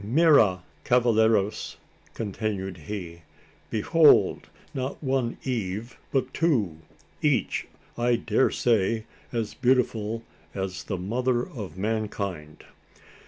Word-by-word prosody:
Mira! 115 Hz, -, +4 dB, 0.2 s
cavalleros!" 110 Hz, -4 st, +2 dB, 0.4 s
continued 100 Hz, -3 st, -3 dB
he. 85 Hz, -5 st, -6 dB, 0.5 s
"Behold! 155 Hz, +8 st, +4 dB, 0.2 s
not 130 Hz, +3 st, -4 dB
one 130 Hz, -3 st, 0 dB
Eve, 115 Hz, -2 st, -3 dB, 0.2 s
but 130 Hz, -1 st, 0 dB
two! 115 Hz, -, +1 dB, 0.4 s
each, -, -, +1 dB, 0.3 s
I 120 Hz, 0 st, +2 dB
daresay, 115 Hz, -2 st, +1 dB, 0.3 s
as 115 Hz, -3 st, -2 dB
beautiful 115 Hz, -3 st, +1 dB, 0.3 s
as 95 Hz, -1 st, -4 dB
the 95 Hz, -, -3 dB
mother 120 Hz, +6 st, 0 dB
of 100 Hz, -, -8 dB
mankind!" 100 Hz, -7 st, -3 dB
110 Hz, 90 wpm, -26 LUFS, 100-125 Hz, 0.5 s, Mira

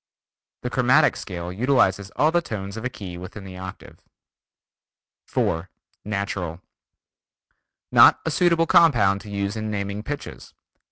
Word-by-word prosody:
The -, -, -3 dB
chromatic -, -, +4 dB
scale 90 Hz, -1 st, -6 dB
utilizes 100 Hz, -4 st, +2 dB
all 155 Hz, +2 st, +3 dB
the 175 Hz, +1 st, +2 dB
tones 100 Hz, -8 st, -6 dB
of 110 Hz, -, -6 dB
a 125 Hz, -, -1 dB
key 95 Hz, -6 st, -8 dB
within 95 Hz, +3 st, -9 dB
the 95 Hz, -1 st, -9 dB
octave. 95 Hz, -1 st, -10 dB, 1.3 s
4. 85 Hz, +3 st, -1 dB, 0.3 s
Natural: 100 Hz, -5 st, -3 dB, 1.3 s
Not -, -, +7 dB
a 160 Hz, -, 0 dB
suitable 170 Hz, 0 st, +3 dB
compound 110 Hz, -13 st, +4 dB
to 105 Hz, -, -11 dB
use 100 Hz, 0 st, -2 dB
in 110 Hz, 0 st, -4 dB
naming 100 Hz, 0 st, -3 dB
pitches. 145 Hz, +6 st, -7 dB
100 Hz, 130 wpm, -23 LUFS, 95-125 Hz, 1.3 s, Not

